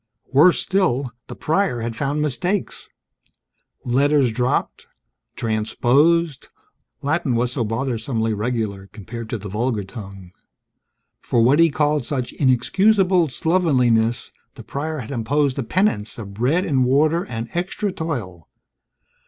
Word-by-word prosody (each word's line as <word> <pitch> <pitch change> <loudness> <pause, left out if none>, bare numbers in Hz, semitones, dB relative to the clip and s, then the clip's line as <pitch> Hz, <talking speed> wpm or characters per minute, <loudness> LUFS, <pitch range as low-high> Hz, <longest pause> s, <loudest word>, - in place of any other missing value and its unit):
Worse 155 +6 +6
still, 150 -10 0 0.2
the - - -8
Prior 160 -7 0
had 115 0 -4
found 145 +4 -1
mistakes: 175 - -2 1.0
letters 135 +1 +3
dropped, 125 +3 -1 0.5
transposed 135 +8 +1 0.6
(Latin 145 -3 0
was 120 +1 0
so 125 -2 -1
bothersomely 115 -1 -2
regular; 105 -3 -3
compared 110 +2 -8
to 115 - -2
the 105 0 -8
vulgar 110 +1 -1
tongue). 95 -3 -10 0.9
For 115 - +1
what 135 +6 +4
he 165 0 +6
called 150 -1 +1
such 125 0 -3
"inexcusable 185 - +3
slovenliness," 125 -8 +1 0.2
the - - -10
Prior 155 +3 -4
had 120 -4 -7
imposed 140 +3 0
a - - -1
penance 115 - 0
of 100 -4 -8
bread 135 - +1
and 135 -4 +2
water 150 +7 +2
and 115 -1 -5
extra 190 +4 -2
toil. 115 - -5
130 Hz, 125 wpm, -21 LUFS, 115-155 Hz, 1.0 s, Worse